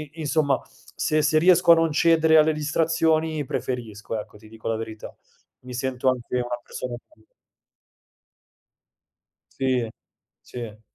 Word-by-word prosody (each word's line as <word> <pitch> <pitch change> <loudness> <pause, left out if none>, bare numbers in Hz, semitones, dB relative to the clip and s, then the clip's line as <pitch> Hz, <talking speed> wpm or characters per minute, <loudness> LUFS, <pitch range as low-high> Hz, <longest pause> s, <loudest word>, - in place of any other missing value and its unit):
i 165 - -9
insomma 145 -2 +1 0.3
se 155 0 +1
se 155 +1 +3
riesco 175 +1 +6
a - - +9
non 165 -1 +1
cedere 160 0 +4
alle 155 +1 +4
distrazioni 160 0 0
preferisco, 115 -4 -4
ecco, 105 - -9
ti 110 +1 -16
dico 110 0 -8
la 115 - 0
verità. 110 -1 -8 0.5
Mi 125 0 -9
sento 130 +1 -1
anche 125 -1 -1
una 120 0 -2
persona 125 -1 -6 0.2
più - - -24 2.4
Sì, 130 -3 0 0.5
sì. 115 -3 -8
135 Hz, 130 wpm, -24 LUFS, 120-160 Hz, 2.4 s, a